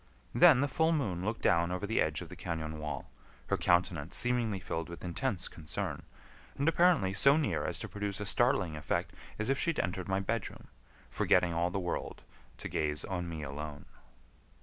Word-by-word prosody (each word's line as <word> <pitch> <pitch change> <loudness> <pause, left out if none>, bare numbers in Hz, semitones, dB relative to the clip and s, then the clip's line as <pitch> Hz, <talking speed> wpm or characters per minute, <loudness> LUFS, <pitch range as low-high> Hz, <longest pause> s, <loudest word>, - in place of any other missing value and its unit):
Then 160 -7 +7
the 145 - +2
full 160 +4 +2
moon 95 - -1
looked 110 +3 -3
down 85 +1 +3
over 90 +3 -2
the 110 +2 +1
edge 75 +1 0
of 85 - -8
the 90 - -9
cañon 80 -3 -4
wall, 75 -4 -5 0.4
her - - +3
countenance 85 -3 +1
seemingly 120 -5 +1
filled 80 -2 -4
with 85 - -9
intense 90 +2 -2
concern, 75 -3 -5 0.6
and 140 - 0
apparently 165 - +4
so 140 +10 +5
near 155 - 0
as - - 0
to - - -4
produce 100 -1 -4
a 105 - -3
startling 100 -7 +2
effect 75 -1 -2 0.2
as 110 +5 0
if 135 - 0
she - - +1
had 165 - -1
entered 90 +1 -2
my 95 0 +1
bedroom, 110 +2 -4 0.4
forgetting 85 -1 +3
all 85 +1 +1
the 90 - -3
world, 90 -2 -4 0.3
to - - -6
gaze 75 -1 -1
on 90 -2 -3
me 80 -2 -5
alone. 75 +1 -6
90 Hz, 190 wpm, -32 LUFS, 85-115 Hz, 0.6 s, Then